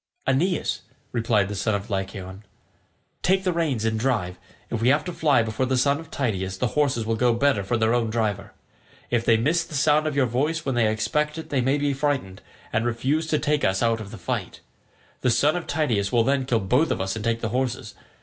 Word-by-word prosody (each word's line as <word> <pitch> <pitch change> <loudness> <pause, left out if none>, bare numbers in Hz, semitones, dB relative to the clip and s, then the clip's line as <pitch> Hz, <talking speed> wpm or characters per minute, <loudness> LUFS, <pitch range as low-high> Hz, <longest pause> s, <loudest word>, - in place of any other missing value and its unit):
"Aeneas," 160 +7 0 0.3
replied 110 -4 +1
the 105 - -5
son 105 +2 0
of 100 0 -5
Lycaon, 95 0 -4 0.8
"take 190 +1 +2
the 180 -2 +1
reins 145 -10 0
and 110 0 0
drive; 110 -8 -1 0.3
if 115 - -2
we 115 - +2
have 145 +2 +3
to 180 - -4
fly 150 -7 +3
before 110 +4 -1
the 130 0 +1
son 140 +3 +2
of 160 - -11
Tydeus 95 -8 -2
the 125 - 0
horses 135 -6 +1
will 115 +1 0
go 120 +1 +2
better 125 -5 +2
for 120 +5 0
their 110 +1 +2
own 120 -2 +1
driver. 110 -3 -2 0.6
If 120 -2 +2
they 115 - +5
miss 155 +9 +1
the 160 - -9
sound 150 +2 +3
of 150 - -2
your 140 -2 +3
voice 150 +7 -1
when 135 - 0
they 115 -3 +2
expect 150 +8 -1
it 160 - -7
they 135 -3 +2
may 135 +3 +2
be 145 -1 0
frightened, 135 -9 -2 0.3
and 110 - +1
refuse 130 +7 0
to 155 - +1
take 150 0 0
us 95 +3 +1
out 115 -1 +1
of 100 - -8
the - - -9
fight. - - -4 0.6
The 130 - +2
son 145 +6 +3
of 175 - -4
Tydeus 120 -10 0
will 120 -2 +3
then 135 +1 +1
kill 120 -4 +1
both 125 +12 +2
of - - -1
us 95 +1 -2
and 110 - -5
take 115 0 0
the 110 - -1
horses. 125 +1 -2
120 Hz, 225 wpm, -24 LUFS, 110-145 Hz, 0.8 s, they